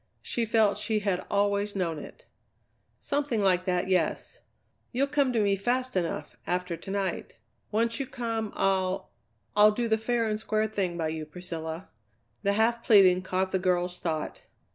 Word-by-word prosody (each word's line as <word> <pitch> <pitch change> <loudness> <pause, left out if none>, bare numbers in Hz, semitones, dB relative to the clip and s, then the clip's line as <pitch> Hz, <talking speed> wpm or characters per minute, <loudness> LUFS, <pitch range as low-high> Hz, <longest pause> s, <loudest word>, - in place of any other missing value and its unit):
She 235 - -1
felt 215 -2 +3
she 215 0 0
had 195 -3 0
always 200 0 +1
known 170 -5 -1
it. - - -12 0.7
"Something 285 -5 -1
like 185 -2 +2
that, 180 0 0
yes. 180 -4 0 0.5
You'll 265 +3 +2
come 280 -2 +1
to 235 - +1
me 200 -2 +3
fast 250 +5 -1
enough, 175 -3 -2
after 180 -1 -1
to 195 - -11
night. 195 -1 -2 0.4
Once 230 +3 +1
you 275 - -2
come 230 -4 -3
I'll 190 0 0 0.4
I'll 210 +1 +7
do 235 +2 -1
the 220 0 +2
fair 230 +1 0
and 215 -1 -1
square 215 0 0
thing 195 -5 -2
by 160 -2 -1
you, 155 -1 -5
Priscilla." 165 0 -6 0.5
The 200 -1 +2
half 230 +2 +2
pleading 185 -4 +6
caught 185 0 -1
the 190 - +1
girl's 180 -1 0
thought. 160 -3 -3
200 Hz, 165 wpm, -28 LUFS, 180-225 Hz, 0.7 s, I'll